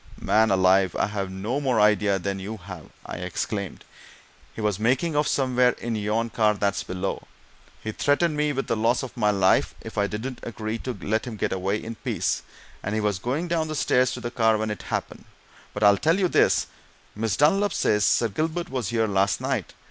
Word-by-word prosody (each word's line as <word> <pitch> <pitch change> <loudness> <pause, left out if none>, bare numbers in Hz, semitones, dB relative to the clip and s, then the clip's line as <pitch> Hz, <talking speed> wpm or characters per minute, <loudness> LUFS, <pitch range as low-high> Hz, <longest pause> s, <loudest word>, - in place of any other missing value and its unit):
"Man 110 +1 +3
alive, 95 -1 +3
I've 100 -2 -1
no 105 +8 -3
more 130 -5 +1
idea 105 -1 +3
than 95 +1 -3
you 105 +4 -6
have!" 90 -4 -10 0.2
I - - -6
exclaimed. 90 +2 -4 0.7
"He - - -11
was 105 -3 0
making 130 +8 +1
off 150 0 +2
somewhere 125 -2 +2
in 120 -1 -4
yon 110 +2 -1
car 105 -1 +2
that's 100 -1 0
below 90 0 -4 0.6
he 110 - -3
threatened 150 +7 +1
me 150 0 +1
with 135 -1 -2
the 115 - 0
loss 115 +4 +1
of 130 - -7
my 105 - +2
life 95 -2 +2
if - - -5
I 100 - +2
didn't 120 +5 -5
agree 110 -1 -4
to 125 -2 -5
let 110 +6 -1
him 120 - -5
get - - -1
away 95 +2 -1
in 115 - -5
peace, - - -2 0.4
and 105 +2 -3
he - - +1
was 105 -3 0
going 140 - -2
down 165 -2 0
the 155 - -4
stairs 130 -3 +2
to - - -5
the 120 0 -5
car 110 -3 +3
when 110 0 -2
it 105 - -5
happened. - - -4 0.5
But - - -3
I'll 100 -1 +6
tell 160 - +2
you 190 -2 +2
this: - - +3 0.5
Miss 110 -1 -1
Dunlop 195 +7 +3
says 105 -9 +1
Sir 115 - +3
Gilbert 160 - -2
was 125 -6 -2
here 115 -1 +1
last 100 -1 +1
night! - - -3
110 Hz, 205 wpm, -25 LUFS, 100-130 Hz, 0.7 s, I'll